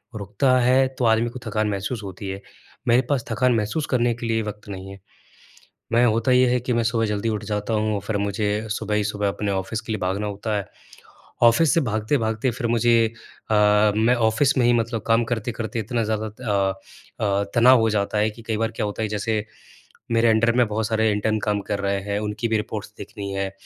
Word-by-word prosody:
रुकता 110 Hz, +6 st, +1 dB
है 130 Hz, +2 st, +4 dB
तो 125 Hz, -, 0 dB
आदमी 115 Hz, +1 st, +3 dB
को 125 Hz, -, -9 dB
थकान 110 Hz, -1 st, 0 dB
महसूस 105 Hz, +3 st, -3 dB
होती 95 Hz, +1 st, -7 dB
है, 95 Hz, +1 st, -5 dB, 0.5 s
मेरे 120 Hz, +2 st, +5 dB
पास 140 Hz, -4 st, 0 dB
थकान 125 Hz, -1 st, +2 dB
महसूस 115 Hz, +8 st, -1 dB
करने 120 Hz, -1 st, +2 dB
के 120 Hz, +1 st, -7 dB
लिए 115 Hz, 0 st, +1 dB
वक़्त 105 Hz, -1 st, -7 dB
नहीं 95 Hz, 0 st, -7 dB
है। 100 Hz, -, -11 dB, 0.9 s
मैं 120 Hz, +1 st, +4 dB
होता 115 Hz, +3 st, +2 dB
ये 125 Hz, 0 st, +5 dB
है 125 Hz, -, +2 dB
कि 125 Hz, +1 st, -2 dB
मैं 115 Hz, 0 st, +1 dB
सुबह 115 Hz, 0 st, +1 dB
जल्दी 105 Hz, +2 st, -2 dB
उठ 105 Hz, -2 st, -2 dB
जाता 105 Hz, +1 st, -3 dB
हूँ 105 Hz, -1 st, 0 dB
फिर 110 Hz, -, -1 dB
मुझे 105 Hz, +1 st, -1 dB
सुबह 105 Hz, 0 st, -2 dB
ही 105 Hz, -1 st, +1 dB
सुबह 105 Hz, -1 st, -1 dB
अपने 100 Hz, +1 st, -2 dB
ऑफिस 95 Hz, +3 st, -2 dB
के 110 Hz, -, -5 dB
लिए 110 Hz, -, -2 dB
भागना 95 Hz, +3 st, -1 dB
होता 105 Hz, +2 st, -3 dB
है 100 Hz, -, -3 dB, 0.8 s
ऑफिस 125 Hz, +5 st, +5 dB
से 165 Hz, -, +3 dB
भागते-भागते 110 Hz, 0 st, 0 dB
फिर 120 Hz, 0 st, -3 dB
मुझे 120 Hz, 0 st, +3 dB, 0.6 s
अ, -, -, +3 dB, 0.4 s
मैं 115 Hz, +3 st, +3 dB
ऑफिस 120 Hz, +5 st, +2 dB
में 120 Hz, -, +3 dB
ही 120 Hz, -, +5 dB
मतलब 115 Hz, -1 st, -1 dB
काम 115 Hz, +1 st, +3 dB
करते-करते 115 Hz, 0 st, -3 dB
इतना 115 Hz, +2 st, -2 dB
ज़्यादा 110 Hz, 0 st, -2 dB
अ 105 Hz, -4 st, -1 dB, 0.5 s
अ, 100 Hz, -1 st, +1 dB
तनाव 120 Hz, +1 st, +6 dB
हो 115 Hz, -, +2 dB
जाता 105 Hz, 0 st, 0 dB
है 110 Hz, +1 st, +2 dB
कि 115 Hz, +2 st, -13 dB
कई 110 Hz, -1 st, -2 dB
बार 115 Hz, 0 st, 0 dB
क्या -, -, -1 dB
होता 105 Hz, +2 st, -4 dB
है 110 Hz, -, -1 dB
जैसे 105 Hz, 0 st, -1 dB, 0.7 s
मेरे 115 Hz, 0 st, +3 dB
अंडर 115 Hz, +1 st, +3 dB
में 125 Hz, -2 st, +4 dB
बहुत 110 Hz, 0 st, -1 dB
सारे 110 Hz, -1 st, +1 dB
इंटर्न 110 Hz, +1 st, 0 dB
काम 105 Hz, -1 st, 0 dB
कर 100 Hz, -, 0 dB
रहे 100 Hz, 0 st, 0 dB
हैं, 100 Hz, 0 st, -2 dB
उनकी 105 Hz, +3 st, -3 dB
भी 110 Hz, -, +1 dB
रिपोर्ट्स 105 Hz, -1 st, -5 dB
देखनी 100 Hz, -2 st, -7 dB
है, 95 Hz, 0 st, -2 dB
110 Hz, 215 wpm, -23 LUFS, 105-120 Hz, 0.9 s, तनाव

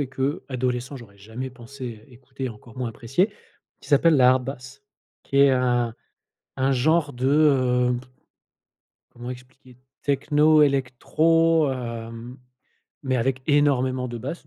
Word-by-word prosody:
et 140 Hz, -, -2 dB
qu'adolescent 130 Hz, -1 st, -3 dB
j'aurais 100 Hz, -5 st, -14 dB
jamais 115 Hz, +6 st, -7 dB
pensé 120 Hz, -2 st, -9 dB
écouter, 130 Hz, +1 st, -8 dB
encore 110 Hz, +1 st, -13 dB
moins 125 Hz, -2 st, -3 dB
apprécier, 135 Hz, -, -1 dB, 0.5 s
qui -, -, -15 dB
s'appelle 155 Hz, +2 st, +4 dB
la 125 Hz, -2 st, +6 dB
Hardbass. 130 Hz, +1 st, -3 dB, 0.4 s
Qui 140 Hz, -, -5 dB
est 140 Hz, 0 st, +6 dB
un 120 Hz, -3 st, +1 dB, 0.6 s
un 135 Hz, +1 st, +1 dB
genre 145 Hz, +3 st, +1 dB
de, 125 Hz, +2 st, -2 dB
heu, 130 Hz, -4 st, +3 dB, 1.2 s
comment 120 Hz, +1 st, -8 dB
expliquer? 125 Hz, 0 st, -13 dB, 0.3 s
Techno, 150 Hz, +2 st, +3 dB
électro, 155 Hz, +4 st, +2 dB
hem, 115 Hz, 0 st, -7 dB, 0.6 s
mais 130 Hz, -2 st, 0 dB
avec 130 Hz, +2 st, -1 dB
énormément 130 Hz, -4 st, +2 dB
de 120 Hz, -1 st, -6 dB
basses, 140 Hz, +9 st, -7 dB
130 Hz, 125 wpm, -24 LUFS, 125-140 Hz, 1.2 s, la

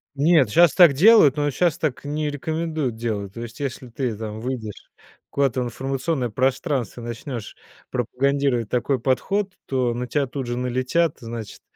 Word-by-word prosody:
Нет, 145 Hz, -4 st, +4 dB
щас 170 Hz, +4 st, +5 dB
так 175 Hz, -4 st, +8 dB
делают, 160 Hz, -, +6 dB
но 145 Hz, 0 st, +1 dB
щас 170 Hz, +2 st, +1 dB
так 145 Hz, -5 st, -2 dB
не 150 Hz, +1 st, -2 dB
рекомендуют 155 Hz, -3 st, -2 dB
делать. 105 Hz, -4 st, -3 dB
То 115 Hz, -, -7 dB
есть, 115 Hz, +2 st, -8 dB
если 130 Hz, -2 st, -4 dB
ты 120 Hz, 0 st, -3 dB
там 110 Hz, -1 st, -6 dB
выйдешь 115 Hz, -4 st, -6 dB, 0.4 s
куда-то 135 Hz, -3 st, +1 dB
в -, -, -1 dB
информационное 135 Hz, +2 st, -2 dB
пространство, 130 Hz, 0 st, -1 dB
начнёшь 120 Hz, 0 st, -6 dB, 0.4 s
пропагандировать 130 Hz, -1 st, 0 dB
такой 125 Hz, +1 st, 0 dB
подход, 190 Hz, -, 0 dB
то 125 Hz, -3 st, 0 dB
на 125 Hz, +1 st, -4 dB
тя 140 Hz, +2 st, 0 dB
тут 130 Hz, -1 st, -5 dB
же 120 Hz, 0 st, -2 dB
налетят, 130 Hz, +6 st, 0 dB
значит, 115 Hz, -2 st, -7 dB
130 Hz, 160 wpm, -23 LUFS, 120-145 Hz, 0.4 s, так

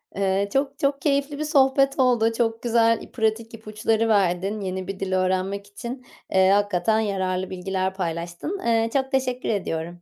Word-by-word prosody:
Eee, 195 Hz, +1 st, 0 dB
çok, 275 Hz, +1 st, 0 dB
çok 275 Hz, 0 st, 0 dB
keyifli 285 Hz, 0 st, 0 dB
bir 305 Hz, -, -1 dB
sohbet 275 Hz, -2 st, +3 dB
oldu. 235 Hz, -3 st, +3 dB
Çok 225 Hz, -1 st, 0 dB
güzel 230 Hz, -1 st, +3 dB
i -, -, -12 dB
pratik 225 Hz, 0 st, -1 dB
ipuçları 220 Hz, +1 st, -1 dB
verdin 195 Hz, +1 st, +1 dB
yeni 185 Hz, -1 st, -4 dB
bir 195 Hz, -1 st, -5 dB
dil 190 Hz, -1 st, -2 dB
öğrenmek 185 Hz, +2 st, 0 dB
için. 240 Hz, +5 st, -8 dB, 0.3 s
Eee, 190 Hz, 0 st, +4 dB
hakikaten 205 Hz, +1 st, +2 dB
yararlı 190 Hz, -3 st, -1 dB
bilgiler 190 Hz, +1 st, -2 dB
paylaştın. 175 Hz, -, -4 dB
Eee, 230 Hz, -1 st, +2 dB
çok 265 Hz, 0 st, 0 dB
teşekkür 255 Hz, -1 st, -1 dB
ediyorum. 175 Hz, -4 st, -3 dB
215 Hz, 160 wpm, -24 LUFS, 190-250 Hz, 0.3 s, Eee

